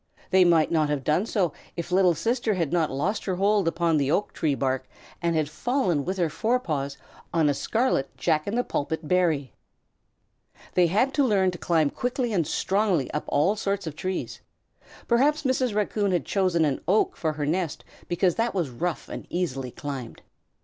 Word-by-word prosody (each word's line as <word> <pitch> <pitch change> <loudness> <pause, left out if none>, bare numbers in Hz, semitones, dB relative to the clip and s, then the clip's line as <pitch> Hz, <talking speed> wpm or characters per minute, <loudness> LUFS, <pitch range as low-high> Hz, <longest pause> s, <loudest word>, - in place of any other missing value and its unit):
They 185 0 +6
might 170 -3 +4
not 155 -3 +2
have 145 -2 -1
done 160 - +1
so 195 -7 +1
then - - -22 0.2
if 170 +1 -5
Little 180 -2 +4
Sister 230 +1 0
had 165 -5 -1
not 165 -3 +2
lost 170 +11 -2
her 190 - -1
hold 200 0 +2
upon 165 -1 +1
the 140 -2 +1
oak 200 +7 0
tree 150 -4 0
bark 130 -1 -1 0.3
and 165 -3 +1
fallen 175 - 0
with 190 +2 -2
her 175 -2 +2
forepaws 155 - -1 0.3
on 165 -3 +2
a - - +2
scarlet 220 - 0
jack 155 -1 +1
in 205 - -1
the 245 - +2
pulpit 155 -3 -3
berry. 160 -8 +1 1.2
They 180 -1 +4
had 225 +10 +1
to 285 - +3
learn 195 -7 +3
to 175 - -9
climb 160 -4 +2
quickly 245 -1 -2
and 170 -6 +1
strongly 195 -7 +1
up 150 - -3
all 180 +9 +2
sorts 200 -2 -2
of 155 -2 -5
trees. 185 +3 -4 0.7
Perhaps 290 +6 +3
Mrs. 260 -4 0
Raccoon 205 -1 0
had 175 -5 0
chosen 185 -5 +2
an 140 -3 -1
oak 205 +4 +2
for 155 -2 -1
her 150 -1 -3
nest 165 0 -2 0.2
because 175 0 +2
that 230 -1 0
was 170 -8 -1
rough 170 +8 -3
and - - -7
easily 135 -8 -2
climbed. 140 -5 -7
175 Hz, 185 wpm, -26 LUFS, 155-205 Hz, 1.2 s, They